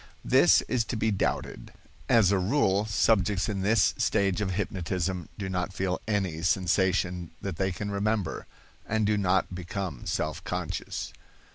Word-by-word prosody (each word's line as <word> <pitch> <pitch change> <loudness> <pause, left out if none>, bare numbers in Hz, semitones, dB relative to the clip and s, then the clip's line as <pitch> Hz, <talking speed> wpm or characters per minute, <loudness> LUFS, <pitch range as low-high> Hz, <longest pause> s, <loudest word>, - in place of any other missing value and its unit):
(This - - +5
is 125 -3 0
to 120 - -4
be 110 0 +1
doubted. 100 - -2 0.4
As 110 -5 +5
a 100 - +3
rule, 100 -1 +2
subjects 105 -3 +2
in 100 -3 -2
this 105 +3 +3
stage 100 0 +1
of 95 -2 -1
hypnotism 90 -2 -2
do 100 - -4
not 90 0 -2
feel 95 -1 -2
any 95 -7 -1
sensation 90 -1 +1
that 95 -5 -5
they 95 0 0
can 100 +3 -4
remember, 100 -3 -1 0.4
and 110 0 +1
do 105 +1 +2
not 95 -2 +1
become 90 -5 -5
self 75 +2 -2
conscious.) 90 -3 -4
95 Hz, 150 wpm, -28 LUFS, 90-105 Hz, 0.4 s, This